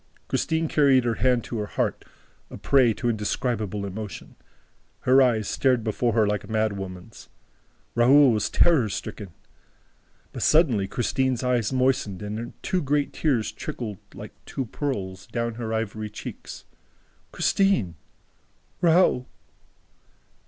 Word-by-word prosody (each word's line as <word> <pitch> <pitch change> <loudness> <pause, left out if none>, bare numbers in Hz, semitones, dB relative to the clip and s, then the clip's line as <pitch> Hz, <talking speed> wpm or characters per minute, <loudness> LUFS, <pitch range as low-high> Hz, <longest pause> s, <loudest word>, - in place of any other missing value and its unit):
'" - - -34
Christine 160 0 0
carried 140 -4 +4
her 120 -1 0
hand 125 -2 +3
to 115 - -5
her 105 - -3
heart, - - -2 0.5
a - - -9
prey 130 -4 +3
to 120 - -3
indescribable 105 -2 -2
emotion. 105 +2 -7 0.7
Her 130 +2 +5
eyes 115 -5 +2
stared 130 -4 +1
before 115 +1 0
her 110 -2 +3
like 105 0 -1
a - - -12
madwoman's. 100 -3 -4 0.6
Raoul 130 +3 +6
was 110 -2 0
terror 150 -11 +3
stricken. 100 +1 -6 1.0
But - - -6
suddenly 130 - +3
Christine's 130 +3 -1
eyes 125 -3 +1
moistened 130 -7 0
and 110 +3 -5
two 185 - 0
great 145 0 0
tears 130 -8 0
trickled, 105 -6 -6 0.2
like - - -9
two 135 - -3
pearls, 100 -8 -4
down 115 -1 -2
her 110 -1 -3
ivory 110 -1 -3
cheeks. 105 - -9 0.7
"Christine!" 195 - +1 0.9
"Raoul!" 170 -7 +3
115 Hz, 130 wpm, -25 LUFS, 105-130 Hz, 1.0 s, Raoul